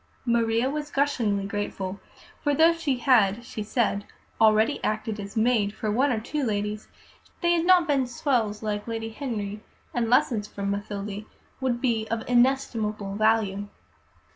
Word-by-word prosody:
Maria 235 Hz, 0 st, +2 dB
was 295 Hz, +1 st, -3 dB
gushingly 235 Hz, -9 st, 0 dB
grateful, 200 Hz, -1 st, -4 dB, 0.4 s
for 290 Hz, -1 st, +1 dB
though 325 Hz, +3 st, +6 dB
she 315 Hz, -6 st, -1 dB
had 235 Hz, -3 st, +3 dB
(she 220 Hz, -, -6 dB
said) 210 Hz, -1 st, 0 dB, 0.4 s
already 220 Hz, +4 st, +4 dB
acted 215 Hz, 0 st, -2 dB
as 200 Hz, +2 st, -7 dB
maid 220 Hz, -3 st, +2 dB
to 215 Hz, -, -1 dB
one 260 Hz, +6 st, +2 dB
or 225 Hz, -, 0 dB
two 285 Hz, +6 st, -3 dB
ladies, 210 Hz, -2 st, -2 dB, 0.5 s
they 345 Hz, -1 st, +3 dB
had 335 Hz, -1 st, +1 dB
not 365 Hz, -2 st, +6 dB
been 275 Hz, -4 st, +2 dB
"swells" 240 Hz, -5 st, -1 dB
like 210 Hz, 0 st, -3 dB
Lady 225 Hz, -1 st, -3 dB
Henry, 220 Hz, -5 st, -4 dB, 0.3 s
and 235 Hz, -2 st, 0 dB
lessons 230 Hz, -3 st, +2 dB
from 200 Hz, -1 st, -3 dB
Mathilde 205 Hz, 0 st, -4 dB, 0.3 s
would 255 Hz, -3 st, 0 dB
be 225 Hz, -4 st, 0 dB
of 230 Hz, 0 st, -3 dB
inestimable 235 Hz, -5 st, +1 dB
value. 210 Hz, -2 st, +1 dB
225 Hz, 150 wpm, -26 LUFS, 205-255 Hz, 0.5 s, though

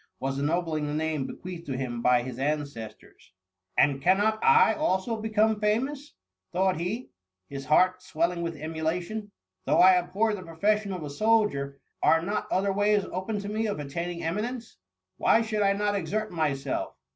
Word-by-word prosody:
was 135 Hz, +1 st, -2 dB
ennobling 155 Hz, 0 st, 0 dB
the 145 Hz, -, -3 dB
name 155 Hz, -3 st, -1 dB
bequeathed 175 Hz, -2 st, -8 dB
to 135 Hz, -2 st, -3 dB
him 120 Hz, -3 st, -3 dB
by 125 Hz, 0 st, +4 dB
his 125 Hz, 0 st, -7 dB
ancestors. 140 Hz, -10 st, -5 dB, 0.4 s
And 140 Hz, -2 st, +3 dB
cannot 205 Hz, +6 st, +2 dB
I 460 Hz, 0 st, +6 dB
also 230 Hz, -7 st, 0 dB
become 220 Hz, 0 st, +2 dB
famous 265 Hz, +8 st, -1 dB, 0.2 s
?" 95 Hz, 0 st, -59 dB
thought 185 Hz, -2 st, +1 dB
he, 210 Hz, +9 st, -4 dB, 0.4 s
his 140 Hz, -1 st, -6 dB
heart 185 Hz, +5 st, +3 dB
swelling 170 Hz, +1 st, -1 dB
with 165 Hz, -1 st, -3 dB
emulation. 165 Hz, +7 st, -3 dB, 0.2 s
" -, -, -52 dB
Though -, -, +2 dB
I 185 Hz, 0 st, +8 dB
abhor 190 Hz, +5 st, 0 dB
the 205 Hz, -, -5 dB
profession 200 Hz, +5 st, 0 dB
of 180 Hz, -4 st, -4 dB
a 145 Hz, -, -5 dB
soldier 145 Hz, -8 st, +1 dB, 0.2 s
are 165 Hz, 0 st, +4 dB
not 205 Hz, +4 st, -3 dB
other 195 Hz, +1 st, +1 dB
ways 205 Hz, 0 st, +2 dB
open 190 Hz, +4 st, -3 dB
to 200 Hz, -, -6 dB
me 220 Hz, +1 st, -1 dB
of 205 Hz, -, -2 dB
attaining 170 Hz, +4 st, -4 dB
emi 170 Hz, +5 st, -1 dB
nence? 240 Hz, 0 st, -6 dB, 0.4 s
Why 225 Hz, -, +4 dB
should 215 Hz, -1 st, -2 dB
I 200 Hz, -1 st, +4 dB
not 205 Hz, +1 st, 0 dB
exert 205 Hz, +3 st, -2 dB
myself? 140 Hz, -5 st, -2 dB
180 Hz, 175 wpm, -27 LUFS, 150-210 Hz, 0.4 s, I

